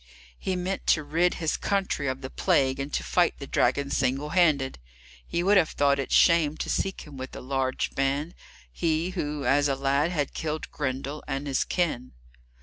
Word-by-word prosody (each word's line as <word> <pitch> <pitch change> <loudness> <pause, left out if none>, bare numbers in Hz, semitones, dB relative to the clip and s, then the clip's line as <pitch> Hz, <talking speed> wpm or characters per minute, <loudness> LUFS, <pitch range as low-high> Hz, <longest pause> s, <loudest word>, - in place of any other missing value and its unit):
He 190 - -2
meant 185 +2 -3
to 155 - +3
rid 165 +5 +1
his 160 -2 -1
country 190 -7 -1
of 130 0 -2
the 130 - -7
plague, 130 0 +2
and 140 +2 -4
to - - -1
fight 175 -1 +2
the 140 - -7
dragon 140 +2 +1
single 135 +3 0
handed. 150 - +2 0.5
He 170 - -1
would 200 +2 +5
have 165 -4 +4
thought 140 -1 +2
it 135 - -3
shame 160 -3 +4
to - - -3
seek 195 0 -1
him 145 -3 -11
with 130 0 -7
a - - -6
large 130 0 -2
band, 140 +4 -1 0.4
he 165 - 0
who, 150 -6 -3
as 145 +3 +3
a 135 - +1
lad, 140 +3 +1
had 150 -6 -2
killed 155 -1 -4
Grendel 140 +1 -3
and 135 +1 -3
his 135 -2 +1
kin. 155 -9 -2
145 Hz, 190 wpm, -27 LUFS, 135-170 Hz, 0.5 s, would